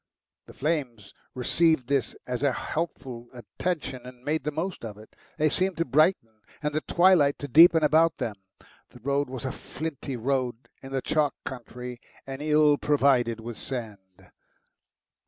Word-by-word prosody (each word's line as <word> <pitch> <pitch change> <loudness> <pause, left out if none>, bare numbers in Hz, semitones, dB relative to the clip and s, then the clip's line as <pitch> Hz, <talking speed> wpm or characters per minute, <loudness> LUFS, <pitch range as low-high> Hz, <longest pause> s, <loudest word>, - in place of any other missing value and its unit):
The - - -12
flames 130 -9 -2 0.2
received 160 +2 +2
this 135 -5 0
as 125 0 -3
a 140 -1 +3
helpful 130 -5 -4
attention, 135 +1 -4
and 125 0 -12
made 155 -1 0
the 150 - 0
most 165 +2 -4
of 105 -3 -7
it. 110 +1 -16 0.2
They 155 0 +3
seemed 185 +4 0
to 165 - +1
brighten 130 - +2 0.2
and 150 0 -1
the 155 - 0
twilight 175 -6 +4
to 145 - -6
deepen 160 +3 +7
about 160 +2 +4
them. 105 -3 -3 0.5
The 125 - -15
road 140 +2 0
was 130 0 -6
a 130 - -1
flinty 145 -4 -6
road 125 0 -2
in 135 - -10
the 135 -1 -2
chalk 150 -2 +1
country, 125 -1 -7 0.2
and 135 +1 -6
ill 150 -1 +4
provided 130 -5 +2
with 115 0 -7
sand. 105 -7 -8
135 Hz, 155 wpm, -27 LUFS, 120-155 Hz, 0.5 s, deepen